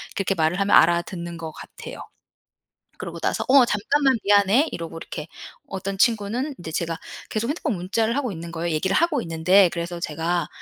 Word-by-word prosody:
그렇게 195 0 0
말을 160 +2 +1
하면 200 - +1
알아듣는 170 0 +1
것 160 -1 -6
같아요. - - -10 1.0
그러고 - - -7
나서 - - -1
"어 265 -1 +7
잠깐만 265 +6 +2
미안해." 205 +9 +4
이러고 165 -1 -6
이렇게 155 -1 -7 0.4
어떤 195 0 -4
친구는 235 +6 +1
이제 160 - -7
제가 165 0 -2 0.3
계속 225 +3 -2
핸드폰 300 -5 -1
문자를 220 +7 -1
하고 260 -5 -1
있는 170 -1 -7
거예요, 170 0 -2
얘기를 190 +5 0
하고 325 -5 +2
있는데. 175 +2 +4
그래서 170 0 -4
제가 170 +2 -1
190 Hz, 395 characters per minute, -23 LUFS, 170-230 Hz, 1.0 s, 어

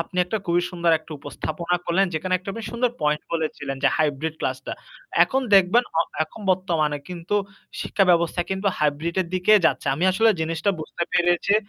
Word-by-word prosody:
আপনি 180 +2 -6
একটা 220 +4 -2
খুবই 175 +1 +2
সুন্দর 170 -2 +1
একটা 155 - -12
উপস্থাপনা 170 +5 -3
করলেন 190 +3 +2
যেখানে 185 +4 -1
একটা 195 +2 -7
বেশ 230 - -5
সুন্দর 240 +1 +1
পয়েন্ট 150 0 +1
বলেছিলেন 155 -4 -3
যে 135 - +5
হাইব্রিড 155 +1 0
ক্লাসটা। 130 0 -3 0.5
এখন 265 +9 0
দেখবেন 195 +6 +5
অ - - +5 0.2
এখন 190 - -14
বর্তমানে 165 -5 0
কিন্তু 175 +2 -4 0.5
শিক্ষা 195 - +1
ব্যবস্থা 170 0 +2
কিন্তু 190 +1 -2
হাইব্রিডের 160 +5 0
দিকে 185 +3 +3
যাচ্ছে। - - -1
আমি 165 - -1
আসলে 225 +4 +4
জিনিসটা 165 +4 0
বুঝতে 170 +2 -5
পেরেছি 175 +3 +2
170 Hz, 170 wpm, -23 LUFS, 155-190 Hz, 0.5 s, যে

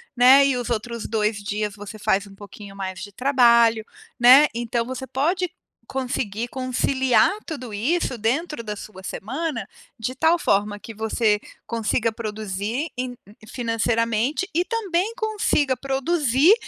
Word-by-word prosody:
né? 260 +3 +7
E 275 -2 +2
os 245 -1 -4
outros 235 0 -3
2 215 -1 0
dias 205 0 -3
você 205 +1 -9
faz 195 0 +1
um 195 - -14
pouquinho 205 0 -11
mais 190 -2 -5
de 205 +1 -8
trabalho, 235 -2 +4 0.3
né? 260 +5 +8
Então 235 0 -2
você 260 +1 -5
pode 335 +8 0 0.4
conseguir 245 -4 -2
conciliar 260 +1 +2 0.2
tudo 255 - -6
isso 260 +7 0
dentro 245 +6 -1
da 210 -2 -4
sua 200 -2 -10
semana, 265 - -4 0.3
de 235 +3 -3
tal 320 +6 +3
forma 205 -7 +1
que 225 - -9
você 220 0 +1 0.3
consiga 230 0 0
produzir 215 - -4
em 250 0 -4 0.3
financeiramente 230 - 0
e 345 +3 +2
também 405 -2 -1
consiga 415 - +1
produzir 275 - +3
240 Hz, 135 wpm, -23 LUFS, 215-275 Hz, 0.4 s, né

